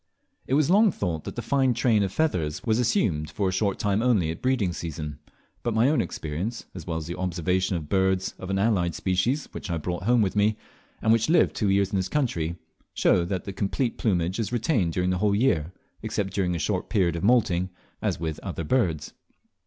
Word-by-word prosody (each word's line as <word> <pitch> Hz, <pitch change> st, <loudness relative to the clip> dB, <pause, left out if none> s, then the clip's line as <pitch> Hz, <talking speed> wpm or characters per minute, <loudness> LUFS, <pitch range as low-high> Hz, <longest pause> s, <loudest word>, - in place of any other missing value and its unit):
It 130 Hz, -, +2 dB
was 150 Hz, +2 st, +3 dB
long 210 Hz, +1 st, +6 dB
thought 85 Hz, -, -3 dB
that -, -, -6 dB
the -, -, -4 dB
fine 135 Hz, -3 st, +2 dB
train 115 Hz, -3 st, +3 dB
of 95 Hz, -2 st, 0 dB
feathers 90 Hz, -, -1 dB
was 110 Hz, 0 st, +1 dB
assumed 95 Hz, -10 st, +1 dB
for 100 Hz, -3 st, -1 dB
a -, -, -3 dB
short 100 Hz, +1 st, 0 dB
time 100 Hz, +1 st, +1 dB
only 105 Hz, -10 st, +2 dB
at 80 Hz, -, -6 dB
the -, -, -23 dB
breeding 125 Hz, -9 st, +1 dB
season, 75 Hz, -3 st, -5 dB, 0.4 s
but 120 Hz, -2 st, -1 dB
my 115 Hz, +4 st, +4 dB
own 155 Hz, -, +2 dB
experience, 85 Hz, +7 st, -4 dB
as 85 Hz, -4 st, -9 dB
well 80 Hz, -2 st, -2 dB
as 80 Hz, -, -5 dB
the 85 Hz, +2 st, -5 dB
observation 90 Hz, +1 st, 0 dB
of 80 Hz, -3 st, -4 dB
birds 95 Hz, +1 st, +1 dB
of 95 Hz, -, -7 dB
an 95 Hz, -, 0 dB
allied 95 Hz, -6 st, +1 dB
species 100 Hz, -, 0 dB
which -, -, -7 dB
I 85 Hz, -, -1 dB
brought 90 Hz, +3 st, -3 dB
home 115 Hz, +3 st, +3 dB
with 95 Hz, -, -1 dB
me, 105 Hz, +1 st, +2 dB, 0.5 s
and 110 Hz, -, +5 dB
which 115 Hz, +3 st, +2 dB
lived 170 Hz, +1 st, +4 dB
two 105 Hz, -, +1 dB
years 100 Hz, 0 st, +2 dB
in 100 Hz, -, 0 dB
this 95 Hz, 0 st, -1 dB
country, 85 Hz, -, -1 dB, 0.4 s
show 85 Hz, -, +3 dB
that 90 Hz, -1 st, -3 dB
the 100 Hz, -, -6 dB
complete 105 Hz, +5 st, -1 dB
plumage 90 Hz, -2 st, 0 dB
is 110 Hz, -2 st, -2 dB
retained 115 Hz, -, +1 dB
during 90 Hz, +1 st, 0 dB
the 90 Hz, -, -1 dB
whole 100 Hz, 0 st, +2 dB
year, 90 Hz, -, +1 dB, 0.3 s
except 95 Hz, -2 st, -2 dB
during 90 Hz, -3 st, 0 dB
a -, -, -1 dB
short 90 Hz, +3 st, -2 dB
period 90 Hz, -6 st, +2 dB
of 85 Hz, -, -4 dB
moulting 95 Hz, -6 st, +3 dB, 0.3 s
as -, -, -1 dB
with 80 Hz, -2 st, -3 dB
most -, -, -9 dB
other 85 Hz, -, -3 dB
birds. 80 Hz, -, 0 dB
95 Hz, 225 wpm, -26 LUFS, 85-115 Hz, 0.5 s, long